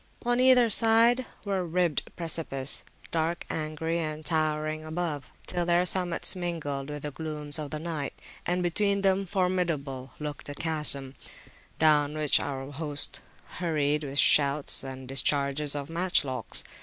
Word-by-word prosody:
On 240 0 +1
either 255 -2 +6
side 230 +3 +5 0.2
were 195 -2 -1
ribbed 175 -2 0
precipices, 155 -5 0 0.3
dark, 165 +1 -1
angry, 160 +2 -2
and 155 -1 -4
towering 155 -1 -1
above, 155 -3 -4 0.2
till 175 -1 -2
their 175 +1 +2
summits 180 0 +1
mingled 150 -6 -4
with 150 -1 -6
the 150 - -4
glooms 150 0 -3
of 150 -2 -6
night; 155 -4 -5 0.2
and 180 +1 -1
between 200 +3 +1
them 195 0 +1
formidable 170 -9 -2
looked 150 -1 -6
the 145 - -6
chasm, 150 -4 +2 0.6
down 150 -1 +3
which 150 -2 +3
our 135 0 -5
host 145 0 -1 0.4
hurried 150 -3 0
with 140 -1 -6
shouts 140 0 +4
and 130 -1 -8
discharges 140 +2 +2
of 140 -1 -4
matchlocks. 165 -6 0
155 Hz, 135 wpm, -27 LUFS, 145-175 Hz, 0.6 s, either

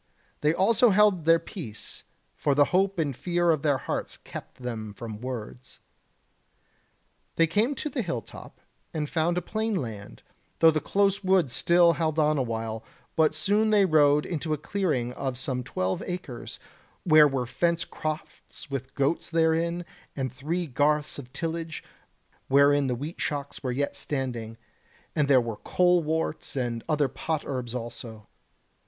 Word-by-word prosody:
They 150 - +3
also 225 +8 +4
held 200 -4 +4
their 165 0 +6
peace; 140 - -8 0.3
for 145 -2 +1
the 145 0 +6
hope 195 +1 +2
and 145 -5 0
fear 175 +3 +1
of 155 -3 +1
their 145 -3 +2
hearts - - -4
kept - - -10
them 110 -4 -5
from 110 -1 -7
words. 125 0 -7 1.6
They 165 - +5
came 215 - +1
to 305 - -3
the 280 -4 -2
hill 145 - -3
top, - - -13 0.3
and 150 -1 -1
found 170 +2 0
a 180 - -1
plain 220 +3 -1
land, 110 - -6 0.3
though 165 0 +7
the 155 - 0
close 200 0 +1
wood 185 -8 +3
still 170 +5 +4
held 160 -2 -1
on 155 -1 +3
a - - +2
while; 115 -2 -3 0.3
but 155 -1 +3
soon 205 +7 +2
they 210 -2 +5
rode 150 -3 +4
into 160 -2 -2
a - - 0
clearing 150 -8 -1
of 130 -1 -3
some 130 -2 -2
twelve 95 -5 -2
acres, 175 -9 -6 0.5
where 155 -3 +7
were 135 -3 -1
fenced 170 +6 0
crofts 155 -2 -6
with 135 -1 -5
goats 140 +4 0
therein, 165 +1 +1 0.3
and 130 -2 -3
three 165 +7 -2
garths 150 +2 +1
of 125 -3 -10
tillage, 165 +2 -4 0.6
wherein 140 0 +5
the 125 - 0
wheat 150 +7 -6
shocks 145 -1 -3
were 130 - -2
yet 140 +3 -1
standing, 120 -5 -3 0.6
and 150 -2 +2
there 135 -2 +6
were 115 -3 -3
coleworts 160 -3 +1
and 120 -3 -2
other 150 -2 +2
pot 155 +4 -3
herbs 125 -3 -4
also. 115 -2 -7
150 Hz, 160 wpm, -27 LUFS, 125-170 Hz, 1.6 s, though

